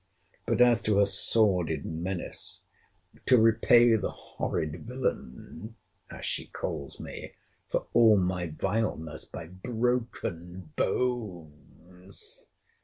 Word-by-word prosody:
—But - - +2
as 120 -2 +6
to 105 -2 +2
her 100 - +6
sordid 95 -6 +2
menace—To 90 +8 -3
repay 115 +1 +6
the 110 - -1
horrid 80 +5 -4
villain, 110 - -4 0.3
as - - -8
she - - -2
calls 70 -2 -5
me, - - -8 0.4
for - - -1
all 115 -3 +7
my 90 -1 0
vileness 80 -2 -2
by 85 - -8
BROKEN 95 -4 -3
BONES! 90 - -4
95 Hz, 100 wpm, -29 LUFS, 85-115 Hz, 0.4 s, all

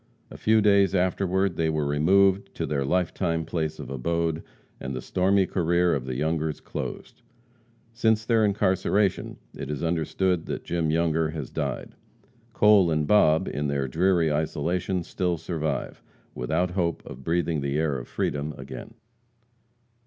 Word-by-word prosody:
A - - -9
few 110 0 +3
days 100 -2 +4
afterward 95 0 +1
they 80 -1 +1
were 75 -2 0
removed 95 +7 +3
to - - -2
their 70 -2 -1
life 90 +5 0
time 85 -3 -1
place 80 -1 -2
of - - -8
abode, 80 +4 -1 0.4
and 65 -1 -5
the - - -3
stormy 95 +1 +2
career 85 -1 +1
of 65 -3 -2
the 65 -1 -4
Youngers 80 +2 -1
closed. - - -7 0.7
Since 110 -1 +1
their 115 -2 +3
incarceration, 100 -1 +1 0.2
it 70 - -6
is 75 0 -3
understood 85 +1 0
that - - -4
Jim 85 -2 -1
Younger 80 0 +1
has 75 -5 -6
died. - - -4 0.6
Cole 105 -5 +5
and 75 -2 +1
Bob, 80 -5 +4
in 75 +1 -2
their 70 -1 -1
dreary 85 +2 +2
isolation, 85 +4 -1
still 90 0 -1
survive, 80 -4 -3 0.3
without 80 +8 -1
hope 85 -3 -1
of 65 - -10
breathing 80 0 0
the 70 +1 -1
air 75 -4 0
of - - -9
freedom 75 +1 -2
again. 65 -1 -9
85 Hz, 155 wpm, -26 LUFS, 75-95 Hz, 0.7 s, Cole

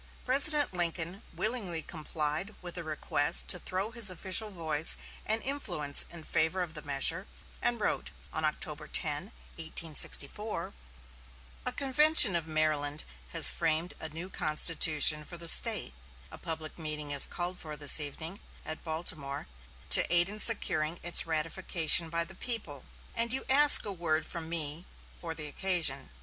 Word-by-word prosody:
President 285 0 +4
Lincoln 175 +2 -2
willingly 200 -8 -3
complied 155 +4 -5
with 175 -1 -11
a 175 - -6
request 150 -2 0
to 180 - +4
throw 190 +5 -5
his 230 -3 +3
official 190 +4 -1
voice 160 -5 -3 0.3
and 220 +1 -2
influence 175 - +1
in 170 -2 -12
favor 160 +4 -2
of 165 -2 -8
the 150 - -6
measure, 150 +6 -1 0.3
and 240 -1 -2
wrote, 210 - -2 0.2
on 160 - -3
October 150 0 -3
10, 150 +2 -2 0.3
1864: 165 +4 -3 0.9
"A - - -1
convention 275 - +4
of 165 -2 -3
Maryland 155 -2 -2 0.3
has - - +6
framed 165 +1 -3
a 160 - -6
new 165 +4 -8
constitution 155 -2 +5
for 175 +3 -9
the 170 0 -6
State; 65 - +4 0.4
a - - -10
public 160 0 -8
meeting 150 -2 -6
is 140 -1 +4
called 180 +1 -3
for 155 -2 -8
this 145 +1 +3
evening 160 +6 -6 0.3
at 155 - -7
Baltimore 155 -4 -5 0.5
to - - +7
aid 175 +1 +2
in 210 +1 -8
securing 170 -8 0
its 175 -1 -1
ratification 165 +1 0
by 170 +1 -1
the - - -13
people; 185 - -2 0.3
and 230 0 0
you 265 - -2
ask 290 +2 +9
a 205 - -5
word 160 -3 -3
from 165 -1 -7
me 160 0 -1 0.3
for 165 -2 -8
the 155 -1 -5
occasion. 155 -5 0
165 Hz, 150 wpm, -28 LUFS, 155-190 Hz, 0.9 s, ask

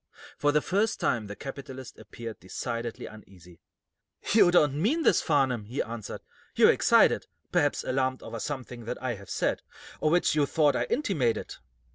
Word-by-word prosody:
For 145 - +2
the 150 +1 +2
first 205 +4 0
time 110 -3 0
the 105 - -7
capitalist 135 -1 -8
appeared 110 +1 -9
decidedly 115 +5 -5
uneasy. 90 -5 -14 0.7
"You 205 -5 +6
don't 150 -4 +3
mean 300 - +1
this, - - +4
Farnum," 135 -8 +1
he 120 +6 -6
answered. 115 -2 -7 0.3
"You're - - +7
excited; - - +4 0.2
perhaps - - +1
alarmed 130 0 -1
over 115 - -6
something 125 -3 -6
that - - -4
I 130 -1 -2
have 100 -3 -11
said, - - -1 0.4
or 155 - +2
which 175 +3 +3
you 150 -2 +2
thought 145 -3 +2
I - - 0
intimated." 150 - -1
130 Hz, 160 wpm, -28 LUFS, 115-150 Hz, 0.7 s, You're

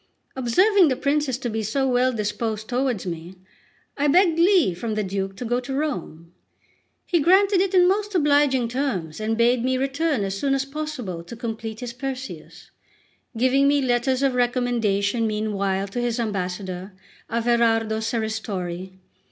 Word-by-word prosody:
Observing 360 - +4
the 260 - +1
princes 280 -1 0
to 255 - -4
be 220 -1 -2
so 265 +6 0
well 255 0 +2
disposed 215 0 -3
towards 250 -5 -1
me, 170 +1 -6 0.6
I 290 0 +1
begged 335 +2 +4
leave 340 - +4
from 220 0 -3
the 215 - 0
Duke 195 0 -3
to 245 - -6
go 240 +2 0
to 260 +2 -5
Rome. 175 - -4 0.7
He 345 - +1
granted 380 +4 +4
it 390 0 0
in 360 -1 +6
most 410 +1 0
obliging 285 -6 +3
terms, 230 - -3
and 220 +1 -1
bade 240 +1 +3
me 260 0 +1
return 275 -1 0
as 195 0 -2
soon 275 +7 0
as 270 0 -1
possible 275 - -5
to 175 +7 -9
complete 225 -1 -5
his 245 -1 -5
Perseus; 265 +1 -7 0.7
giving 260 +3 +3
me 285 0 +3
letters 255 +1 +1
of 270 -2 +2
recommendation 240 -3 +1
meanwhile 200 -2 -1
to 240 +5 -3
his 240 0 -1
ambassador, 185 -3 -4 0.4
Averardo 225 -1 +1
Serristori. 210 -5 -3
240 Hz, 155 wpm, -23 LUFS, 210-275 Hz, 0.7 s, in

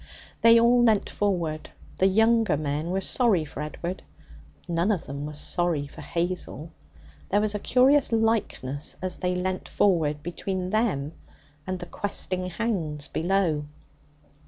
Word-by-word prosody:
They 230 0 +7
all 240 +1 +5
leant 220 -4 +3
forward. 170 -6 -1 0.3
The 190 - +4
younger 225 -2 +3
men 150 +2 -2
were 190 +2 0
sorry 200 -6 +2
for 150 - -7
Edward. 170 +4 -5 0.7
None 170 +4 +1
of 190 -6 -1
them 140 +2 -5
was 150 -1 -7
sorry 170 -5 0
for 140 - -11
Hazel. 170 -3 -3 0.6
There 205 - +3
was 210 0 +1
a 210 - -2
curious 260 +5 +4
likeness, 220 - 0
as 185 0 -3
they 180 0 -1
leant 185 +1 -3
forward, 155 -7 +1
between 185 +2 -3
them 200 -11 0 0.6
and 185 0 -2
the 175 - -7
questing 185 0 -3
hounds 170 -8 -3
below. 170 -4 0
180 Hz, 140 wpm, -26 LUFS, 155-210 Hz, 0.7 s, They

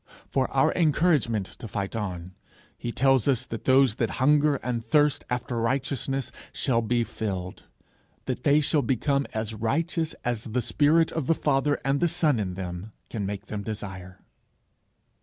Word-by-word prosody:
For - - 0
our - - +3
encouragement 150 - +2
to 115 - -7
fight 100 0 -4
on, 90 -4 -4 0.4
he 120 - -5
tells 135 0 +3
us 135 -4 +2
that 115 - -7
those 130 -3 +5
that 115 - 0
hunger 150 +2 +4
and 120 -2 -2
thirst 145 +5 +2
after 125 -1 -2
righteousness 135 +1 -1 0.2
shall 115 -4 +1
be 120 +1 +1
filled, 95 -5 -5 0.6
that 125 -1 -3
they 145 +1 +4
shall 150 +1 +2
become 140 +3 0
as 110 0 -3
righteous 160 +9 -1
as 120 -2 -1
the 120 +3 -1
spirit 155 +6 +3
of 155 -5 -3
the 165 - +3
Father 145 0 +1
and 135 +1 +2
the 175 - +3
Son 160 -7 +1
in 95 -3 -3
them 90 +3 -6 0.2
can 100 -3 -2
make 100 -1 -5
them 105 -1 -5
desire. 95 -3 -7
125 Hz, 160 wpm, -26 LUFS, 110-145 Hz, 0.6 s, those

